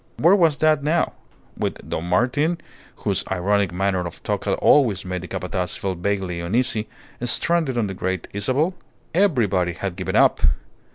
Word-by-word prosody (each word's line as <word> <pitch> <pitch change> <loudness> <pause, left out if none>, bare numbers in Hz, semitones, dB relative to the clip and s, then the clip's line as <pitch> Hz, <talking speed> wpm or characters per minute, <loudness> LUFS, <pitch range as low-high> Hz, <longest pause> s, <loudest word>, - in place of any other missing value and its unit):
Where 175 +5 +5
was 165 -7 +3
that 155 -1 +3
now 155 +4 +1 0.4
with - - -4
Don 80 - -3
Martin 130 - +1 0.5
(whose - - 0
ironic 95 +1 +1
manner 95 -1 0
of 85 - -11
talk - - -2
had - - +1
always 110 -10 +3
made 90 -1 -3
the 90 - -7
Capataz 90 0 -3
feel 100 -3 -2
vaguely 90 -1 -2
uneasy) 110 +4 0 0.4
stranded 150 +1 +1
on 115 - +2
the 95 - -4
Great 95 -1 -3
Isabel? 130 - 0 0.4
Everybody 110 - +2
had 95 +1 -4
given 95 -1 -3
up. - - +5
100 Hz, 160 wpm, -22 LUFS, 90-140 Hz, 0.5 s, Where